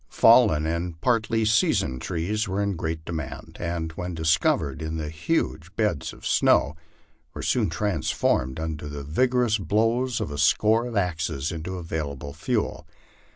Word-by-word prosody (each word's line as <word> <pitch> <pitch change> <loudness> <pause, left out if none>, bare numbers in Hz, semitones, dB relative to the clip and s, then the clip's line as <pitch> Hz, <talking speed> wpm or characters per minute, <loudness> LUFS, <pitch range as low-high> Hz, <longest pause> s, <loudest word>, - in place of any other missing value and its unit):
Fallen 115 -10 +5
and 85 0 -3
partly 115 +1 +1
seasoned 105 - +2
trees 105 +6 -2
were 95 +1 -2
in 100 -1 0
great 80 -1 -4
demand, 80 -4 -6
and, 85 -1 -3
wlien 90 +1 -4
dis 80 -1 +3
covered 70 -1 0
in 80 0 -3
the 75 -1 -3
huge 85 - -2
beds 105 -10 0
of - - -13
snow, 70 +2 +3 0.6
were - - -5
soon 110 -7 +1
transformed, 80 -7 0
under 80 -2 -4
the 70 -1 -6
vigorous 120 - +1
blows 115 +6 +1
of 75 - -3
a 75 - -5
score 110 +9 +3
of 115 -3 -4
axes, 80 -5 -1
into 85 +3 -5
available 75 -5 -5
fuel. 105 - -2
85 Hz, 155 wpm, -25 LUFS, 80-105 Hz, 0.6 s, Fallen